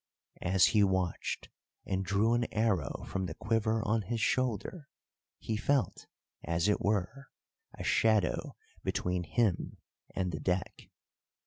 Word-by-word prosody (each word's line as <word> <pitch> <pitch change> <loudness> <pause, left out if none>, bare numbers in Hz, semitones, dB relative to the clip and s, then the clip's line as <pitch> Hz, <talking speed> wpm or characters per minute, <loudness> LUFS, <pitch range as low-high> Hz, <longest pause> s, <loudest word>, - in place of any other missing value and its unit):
As 95 0 +4
he 105 -2 +5
watched 95 -3 -1 0.4
and 95 -1 -1
drew 100 +4 +2
an 120 0 0
arrow 105 - 0
from 95 -1 -2
the 80 - -6
quiver 110 0 0
on 110 +1 +2
his 115 +4 -3
shoulder, 130 - -1 0.5
he 110 - -3
felt, 135 +5 0 0.4
as 85 +3 0
it 105 - +2
were, 110 +7 -1 0.5
a - - -5
shadow 110 -3 +2 0.3
between 90 0 -1
him 100 +2 0 0.4
and 90 -1 0
the 80 - -4
deck. 90 +3 -2
105 Hz, 130 wpm, -32 LUFS, 90-115 Hz, 0.5 s, he